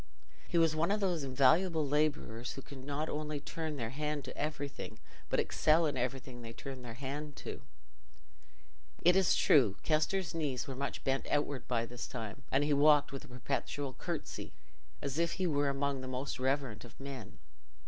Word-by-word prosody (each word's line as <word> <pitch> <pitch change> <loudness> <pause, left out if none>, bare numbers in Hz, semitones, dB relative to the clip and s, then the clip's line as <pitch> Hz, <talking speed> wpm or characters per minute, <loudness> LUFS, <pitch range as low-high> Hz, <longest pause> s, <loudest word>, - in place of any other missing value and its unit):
He 170 - 0
was 165 -2 +5
one 160 +3 +2
of 210 +1 +2
those 180 -6 +1
invaluable 150 +5 +4
labourers 145 -5 0
who 135 - -8
can 135 -2 -10
not 145 +2 -1
only 150 -1 -2
turn 160 +1 -4
their 115 -4 -3
hand 150 +1 -2
to - - -7
everything, 145 -2 -4 0.3
but - - +2
excel 160 +2 +4
in 150 - 0
everything 125 0 -3
they 115 -1 -7
turn 135 +1 -7
their 120 -2 -7
hand 140 +3 -5
to. - - -5 1.4
It 180 +2 +7
is 190 -2 +5
true 105 -9 +5
Kester's 165 +4 +1
knees 145 -6 -1
were 135 - -3
much 140 +2 -3
bent 135 0 0
outward 145 -4 0
by 115 -2 +1
this 120 +1 -6
time, 115 -1 -5
and 135 +2 +4
he 145 0 +2
walked 145 0 +6
with 135 - -6
a - - -13
perpetual 135 +2 -2
curtsy, - - -5 0.5
as 140 +2 -1
if 170 0 +2
he 190 - -1
were 145 -4 +2
among 140 -1 0
the 130 - -6
most 130 +1 -3
reverent 130 -4 0
of 120 -1 -13
men. 135 -5 -7
140 Hz, 180 wpm, -34 LUFS, 130-155 Hz, 1.4 s, It